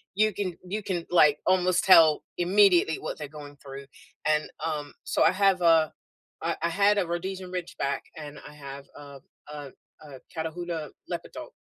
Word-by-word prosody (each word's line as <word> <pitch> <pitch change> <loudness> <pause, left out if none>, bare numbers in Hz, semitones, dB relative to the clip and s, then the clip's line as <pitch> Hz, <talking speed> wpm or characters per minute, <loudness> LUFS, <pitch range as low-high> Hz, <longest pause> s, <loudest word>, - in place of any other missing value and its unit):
You 215 +1 +2
can 185 -3 -4
you 210 +3 -4
can, 175 -4 -3
like, 150 -4 +5
almost 185 -1 +2
tell 165 -5 +6
immediately 180 -2 +4
what - - -6
they're 150 - -6
going 145 -1 -11
through, 140 0 -10 0.4
and, 150 0 +1 0.2
um, 150 -2 -4
so - - -1
I - - +5
have 195 -1 +2
a 165 -2 +4 0.5
I - - -1
I 170 - +2
had 205 +4 +3
a 200 - +2
Rhodesian 185 +1 -4
Ridgeback, 170 -6 -3 0.2
and 150 -1 -9
I 150 - -12
have 140 -1 -10
uh 140 -1 -11 0.3
uh 145 -2 -7 0.4
uh, 140 -3 -11 0.2
Catahoula 160 -1 -4 0.2
Leopard - - -5
dog. - - -8
165 Hz, 170 wpm, -27 LUFS, 150-185 Hz, 0.5 s, tell